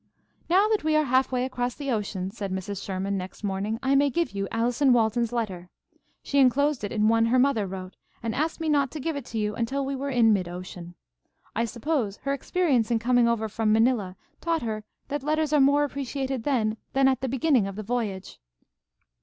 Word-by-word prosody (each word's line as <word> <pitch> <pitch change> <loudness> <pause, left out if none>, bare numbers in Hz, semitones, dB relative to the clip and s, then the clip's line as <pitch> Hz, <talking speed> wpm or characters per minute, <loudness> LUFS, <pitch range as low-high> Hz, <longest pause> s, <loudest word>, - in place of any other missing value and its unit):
"Now 385 +5 +5
that 435 -5 +1
we 310 0 +2
are 310 - +4
half 260 -1 +2
way 250 0 0
across 245 -1 -2
the 280 -2 -3
ocean," 195 -4 -2
said 200 -3 -5
Mrs. 190 +1 -4
Sherman, 195 0 -2
next 185 +3 -9
morning, 200 +2 -2
"I 265 +1 +2
may 280 +1 +4
give 335 +6 -1
you 195 -1 -3
Allison 245 +4 +2
Walton's 230 0 +2
letter. 190 -7 -3 0.5
She 280 - +1
enclosed 275 0 +3
it 205 - -3
in 215 -1 +2
one 225 0 +4
her 250 +2 +3
mother 250 -6 +2
wrote, 185 0 -7 0.3
and 225 -1 -2
asked 315 +4 -1
me 325 - -2
not 285 -3 +2
to 310 - -5
give 320 +3 -2
it 280 -4 -5
to 225 - -6
you 210 -1 0
until 265 +5 -2
we 275 +1 -2
were 275 +1 -3
in 235 -4 +4
mid 185 -3 0
ocean. 175 -1 -8 0.6
I 230 - +1
suppose 235 -3 -2
her 275 - 0
experience 280 -6 +1
in 235 - +2
coming 240 +1 +3
over 230 -1 0
from 215 0 0
Manila 220 -4 +2 0.3
taught 330 -3 0
her 215 -2 -3 0.3
that 290 0 -2
letters 305 +1 0
are 295 - +5
more 285 +2 +4
appreciated 270 -3 -3
then 225 -6 +1 0.2
than 270 0 +4
at 260 -2 +1
the 265 - -1
beginning 260 -4 +2
of 195 - -6
the 215 - -5
voyage." 210 -4 -3
240 Hz, 210 wpm, -26 LUFS, 210-275 Hz, 0.6 s, Now